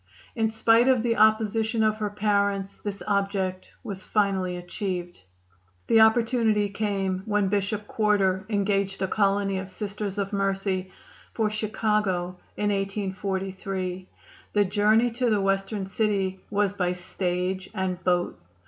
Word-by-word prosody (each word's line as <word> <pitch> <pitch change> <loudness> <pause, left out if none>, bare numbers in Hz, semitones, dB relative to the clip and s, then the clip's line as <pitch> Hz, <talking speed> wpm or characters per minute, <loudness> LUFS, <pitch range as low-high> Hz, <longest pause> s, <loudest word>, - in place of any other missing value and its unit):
In 225 -1 +1
spite 225 +2 +4
of 255 -4 +4
the 235 -1 +1
opposition 220 +1 +3
of 215 0 +2
her 210 -1 -2
parents 200 -1 0
this 205 -1 -4
object 195 -2 -1
was 195 -2 -5
finally 190 -3 0
achieved. 175 - -4 0.6
The 225 - +4
opportunity 220 -2 +3
came 195 -2 -1
when 205 -2 +1
Bishop 205 +1 -1
Quarter 200 -3 +1
engaged 200 -2 0
a - - +1
colony 195 -1 +1
of 190 0 -7
Sisters 200 +1 -4
of 200 0 -2
Mercy 195 -1 -1 0.5
for 215 -2 +1
Chicago 210 -4 -1 0.2
in 205 0 +1
1843. 190 -1 -3 0.4
The 205 -1 +4
journey 215 +4 +3
to 245 +1 0
the 210 -2 +2
Western 195 +1 0
city 195 -2 0
was 205 -1 +1
by 180 -3 0
stage 180 +1 -3
and 185 -1 -2
boat. 180 -1 0
200 Hz, 130 wpm, -26 LUFS, 190-215 Hz, 0.6 s, spite